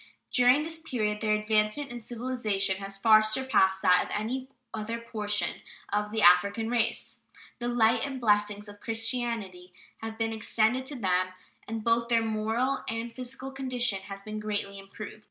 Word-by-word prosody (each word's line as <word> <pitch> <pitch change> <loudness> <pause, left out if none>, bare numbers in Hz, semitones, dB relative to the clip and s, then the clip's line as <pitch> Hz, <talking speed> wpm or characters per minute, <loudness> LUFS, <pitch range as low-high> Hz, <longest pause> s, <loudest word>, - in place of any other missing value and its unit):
During 250 +4 +5
this 325 0 -6
period 215 -9 -2
their 215 -1 +2
advancement 215 +6 0
in 240 - -6
civilization 225 -5 -1
has 195 0 -5
far 215 +1 +7
surpassed 215 -4 +2
that 180 - +5
of - - -9
any 255 +5 -3 0.3
other 220 +1 -3
portion 210 -3 -2 0.3
of 210 0 0
the 220 -1 0
African 200 +6 +5
race. 235 -2 -1 0.4
The 240 - -2
light 230 -1 +3
and 275 -1 -3
the - - -5
blessings 210 -1 +1
of 205 0 -12
Christianity 225 -6 -3 0.3
have 225 0 -6
been 225 0 -1
extended 225 +3 +1
to 290 - -2
them, 185 -5 +1 0.4
and 225 0 -4
both 230 +1 +2
their 230 -1 +3
moral 225 +5 0
and 225 +1 -4
physical 255 +2 -6
condition 255 -6 -1
has 195 0 -8
been 215 0 -5
greatly 205 -2 -3
improved. 200 +2 -9
220 Hz, 165 wpm, -28 LUFS, 210-240 Hz, 0.4 s, far